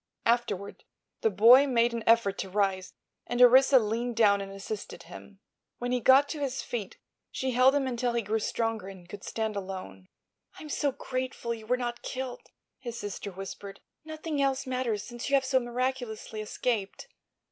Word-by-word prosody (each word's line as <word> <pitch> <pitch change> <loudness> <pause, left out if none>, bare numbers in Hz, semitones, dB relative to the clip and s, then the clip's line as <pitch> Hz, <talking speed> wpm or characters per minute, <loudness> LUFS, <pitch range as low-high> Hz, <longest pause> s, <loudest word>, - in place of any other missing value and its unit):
Afterward 230 -4 0 0.4
the 220 - +3
boy 235 +8 +7
made 235 -2 +2
an 230 -1 -3
effort 225 -4 +3
to 190 - -3
rise, 190 -1 -1 0.3
and 240 - -2
Orissa 260 +2 +7
leaned 235 +1 -1
down 200 -3 +4
and 195 0 -7
assisted 195 +2 -7
him. 200 -1 -13 0.4
When 245 0 -3
he 250 - +1
got 265 +4 +6
to 310 - -4
his 270 -2 -2
feet 215 -6 -5 0.3
she 260 0 -2
held 255 +3 +5
him 285 -2 +1
until 245 -1 -1
he 235 -1 0
grew 215 +2 -1
stronger 225 -2 -2
and 190 -3 -11
could 200 +2 -10
stand 220 -1 -3
alone. 185 - -7 0.5
"I'm 305 - -9
so 285 -1 0
grateful 255 -2 -4
you 220 -1 -10
were 250 +2 +2
not 240 -1 -4
killed," 255 -1 -5 0.4
his 240 -3 -6
sister 205 -1 -6
whispered. 195 +1 -8 0.2
"Nothing 310 -1 -4
else 275 0 0
matters 250 -5 -2
since 240 +2 -6
you 280 - +4
have 270 -1 +2
so 260 0 +3
miraculously 240 -3 -3
escaped." 215 - -3
235 Hz, 175 wpm, -28 LUFS, 205-255 Hz, 0.5 s, boy